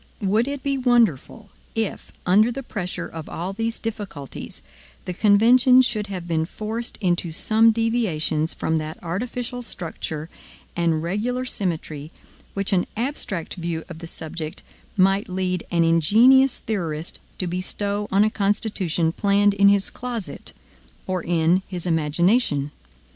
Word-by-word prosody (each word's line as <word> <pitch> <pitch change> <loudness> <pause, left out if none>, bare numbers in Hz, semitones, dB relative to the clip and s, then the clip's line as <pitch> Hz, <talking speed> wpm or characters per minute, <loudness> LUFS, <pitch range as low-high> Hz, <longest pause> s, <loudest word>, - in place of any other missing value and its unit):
Would 215 +5 +2
it 280 -1 -4
be 275 -1 0
wonderful 225 - +1 0.2
if, 225 -3 -3
under 210 +6 +4
the 270 +3 -5
pressure 185 -7 -4
of 160 -1 -8
all 180 +4 -4
these 225 +2 -2
difficulties, 205 -11 -6 0.4
the 180 - -3
convention 240 +6 +6
should 215 -4 0
have 185 -3 -6
been 160 -1 0
forced 220 +4 -4
into 175 -3 +1
some 220 +7 +4
deviations 215 -9 +1
from 160 - 0
that 155 0 -4
artificial 240 +7 -4
structure 160 -7 -5 0.5
and 165 -2 +1
regular 235 +9 -1
symmetry 160 - -3 0.4
which 195 +1 -1
an 180 -2 +2
abstract 230 - -2
view 170 -2 -4
of 165 -2 -8
the 165 - -8
subject 160 +1 -5 0.3
might 195 +1 +3
lead 185 -1 -2
an 170 -1 +2
ingenious 225 - +5
theorist 170 -7 -3 0.2
to 185 - -2
bestow 200 +3 -2
on 195 +2 +5
a 215 - +2
Constitution 195 -5 0
planned 200 +2 +3
in 200 0 +5
his 200 -1 +2
closet 240 -5 -5 0.5
or 185 -1 -2
in 170 +2 +2
his 180 -2 -5
imagination? 160 - +2
195 Hz, 135 wpm, -23 LUFS, 165-225 Hz, 0.5 s, convention